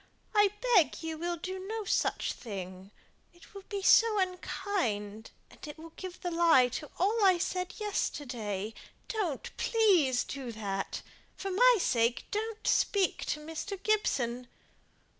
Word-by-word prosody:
I 415 -1 +5 0.3
beg 340 -3 +4
you 320 0 -3
will 345 +1 -2
do 370 +3 -5
no 435 +4 -4
such - - 0
thing. 190 -4 -8 0.5
It 345 - -18
will 395 -1 -10
be 400 -2 -3
so 450 +2 +6
unkind; 335 - -2 0.2
it 295 0 -10
will 325 +1 -11
give 370 +1 -8
the 355 - -3
lie 330 -7 +5
to 285 +4 -6
all 420 +4 +2
I 375 -2 +6
said 365 +1 -2
yesterday. 235 - -3 0.3
Don't, 385 - -3
please, 360 - +3
do 265 -4 -6
that. 195 -3 -4 0.3
For 390 - -4
my - - +6
sake, 235 -6 +1
don't 440 +1 -3
speak 395 -3 +2
to 300 - -2
Mr. 325 +6 -5
Gibson!" 250 - 0
345 Hz, 140 wpm, -30 LUFS, 245-400 Hz, 0.5 s, so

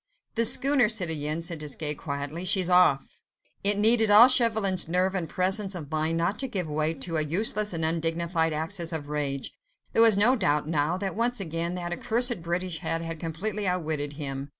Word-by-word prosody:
"The 230 0 +2
schooner, 270 -1 +4
citoyen," 160 -6 -2
said 165 -1 -3
Desgas, 150 0 -2
quietly; 145 +3 -6
"she's 185 -1 +1
off." 180 -7 +2 0.4
It 200 +1 +4
needed 220 +1 +4
all 215 +4 +8
Chauvelin's 220 -9 +1
nerve 185 +2 +1
and 180 -4 -4
presence 190 +1 +1
of 155 -4 -9
mind 155 +1 -1
not 170 +5 -2
to 270 - -1
give 190 -8 -4
way 155 +2 -1
to 165 +3 -4
a - - +2
useless 210 +7 0
and 165 -2 -3
undignified 165 0 -1
access 165 +3 -2
of 145 -2 -6
rage. 140 -2 -4 0.4
There - - +3
was 225 -3 +6
no 230 +6 +4
doubt 150 - 0
now, 155 +2 -1
that 195 0 -4
once 240 +2 0
again, 170 -1 -3
that 175 -1 -5
accursed 240 +1 0
British 175 0 -4
head 165 0 -3
had 165 -1 -7
completely 195 +6 -4
outwitted 155 -5 -3
him. 140 -1 -6
170 Hz, 185 wpm, -26 LUFS, 155-205 Hz, 0.4 s, all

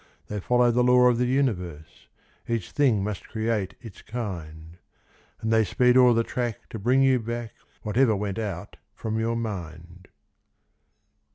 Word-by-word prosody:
They 105 - -3
follow 120 +4 +3
the 125 +1 +2
law 125 0 +6
of 120 -1 +1
the 125 - +2
universe— 90 - -2 0.4
Each 115 -6 -2
thing 125 -9 +2
must 105 -2 -5
create 110 -4 -2
its 115 -7 -12
kind; 85 -8 -7 0.6
And 110 0 0
they 110 0 +5
speed 125 +5 +2
o'er 125 -2 +6
the 115 - +2
track 120 -2 -4
to 110 - -6
bring 125 +6 +3
you 130 -1 +4
back 120 0 -5 0.3
Whatever 110 +2 +2
went 100 +1 -3
out 100 -6 -5 0.2
from 110 0 -3
your 115 +1 0
mind. 90 -5 -6
110 Hz, 155 wpm, -25 LUFS, 95-125 Hz, 0.6 s, law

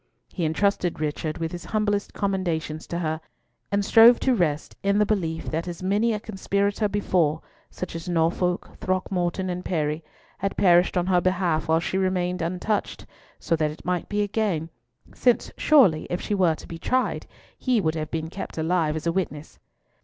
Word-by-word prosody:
He 175 - -1
entrusted 175 +1 0
Richard 155 0 -2
with 165 -1 -3
his 175 +1 -7
humblest 205 -2 0
commendations 170 -6 -2
to 170 - -3
her, 160 -2 -2 0.5
and 200 0 +1
strove 230 +2 +7
to 260 - +3
rest 165 -8 -1
in 200 +1 +2
the 210 - +4
belief 165 -6 -2
that 165 +3 -2
as 175 0 -6
many 205 +5 +2
a 215 - -1
conspirator 200 0 -1
before—such 180 -3 -2
as 165 +1 -5
Norfolk, 175 +1 0
Throckmorton, 185 -1 -1
Parry—had 160 +4 -4
perished 180 0 +4
on 175 - +2
her 180 -1 +3
behalf 175 -4 0
while 160 0 +3
she 185 +3 -1
remained 180 -1 0
untouched, 185 +5 -2 0.5
that 165 - +2
so - - +1
it 150 0 -3
might 180 +1 -2
again 205 -5 0
be, 165 - -16 0.4
since 245 -2 +2
surely, 240 - +4
if 175 - -1
she - - -3
were 180 -5 +3
to - - -12
be 165 - -8
tried, 255 +8 0 0.3
he 250 -3 +1
would 160 -5 +1
have 155 -1 -4
been 160 0 -4
kept 195 - -7
alive 160 -1 +1
as 160 - -5
a 170 - +2
witness. 160 -4 -4
180 Hz, 170 wpm, -25 LUFS, 160-200 Hz, 0.5 s, strove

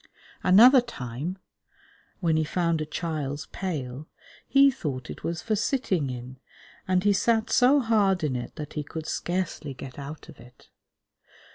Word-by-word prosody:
Another 240 +8 +7
time, 150 - -6 0.8
when 165 -3 +2
he 155 - +2
found 170 0 0
a 155 - -3
child's 150 -3 -3
pail, 150 -6 -4 0.4
he 275 0 +6
thought 130 - -5
it - - -10
was 170 0 -3
for 220 - 0
sitting 200 - 0
in, 125 +1 -7 0.5
and 185 0 +2
he 205 0 +4
sat 220 +2 +1
so 260 +3 +5
hard 205 - +2
in 140 -4 0
it 120 - -5
that 150 -1 -7
he 150 - -2
could 155 +2 -7
scarcely 165 -5 -3
get 130 +2 -9
out 145 +2 -8
of - - -14
it. 125 +2 -18
165 Hz, 155 wpm, -26 LUFS, 140-200 Hz, 0.8 s, Another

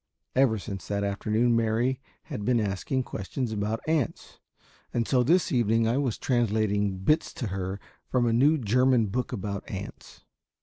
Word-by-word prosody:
Ever 130 -4 +4
since 100 -1 -7
that 100 0 -1
afternoon 110 +4 +1
Mary 115 +4 +1 0.2
had 105 - -6
been 120 +1 +2
asking 105 +6 -1
questions 120 +3 -4
about 105 +1 -2
ants, 155 -6 -2 0.5
and 115 -1 -1
so 130 -2 +3
this 170 +9 +3
evening 115 -3 +2
I 120 +4 +1
was 130 -6 -1
translating 105 -5 +1
bits 150 - +1
to 120 - -3
her 95 +1 -3 0.3
from 125 -2 +1
a 115 - +2
new 145 +7 +4
German 125 0 +3
book 125 +5 -2
about 100 -4 -4
ants. - - -8
115 Hz, 160 wpm, -27 LUFS, 105-125 Hz, 0.5 s, Ever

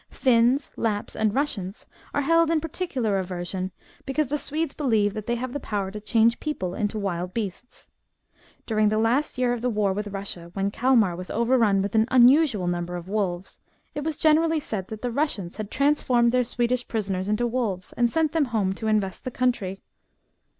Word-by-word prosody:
Finns, 255 +2 +2
Lapps, 210 -3 -2
and 220 -1 +1
Eussians 210 -7 -2 0.3
are 285 - 0
held 330 +2 +4
in 330 -1 +2
particular 285 - -2
aversion, 185 0 -4 0.3
because 275 0 -1
the 295 - 0
Swedes 310 +1 -2
believe 220 -8 +1
that 215 -1 -6
they 240 - +1
have 250 +1 -4
power 200 -4 -3
to 210 - -6
change 230 +1 +3
people 190 - -3
into 205 +2 -2
wild 180 -3 -3
beasts. 225 +2 -5 0.8
During 215 -2 +2
the 215 - 0
last 245 +7 +1
year 250 -1 +2
of 240 - -4
the 250 - 0
war 210 -4 +1
with 210 +2 -3
Russia, 195 -4 -5
when 195 0 0
Calmar 230 -7 +3
was 180 +1 -7
overrun 230 -4 +2
with 200 - -3
an 220 0 +3
unusual 255 - +5
number 175 0 -2
of 175 0 -7
wolves, 195 -3 -2 0.3
it 295 - -4
was 315 -1 -2
generally 320 +1 +3
said 205 -9 -4
that 215 +1 -8
the 245 - -1
Russians 230 - -2
had 215 -2 -5
transformed 255 -4 +2
their 250 0 +3
Swedish 245 +1 -1
prisoners 195 -4 -2
into 210 +3 +1
wolves, 225 -7 -2
and 240 -1 +1
sent 320 -2 +1
them 320 -2 +2
home 215 -6 0
to 220 +3 -5
invest 205 -4 0
the - - -3
country. 235 -7 -1
225 Hz, 185 wpm, -25 LUFS, 195-255 Hz, 0.8 s, unusual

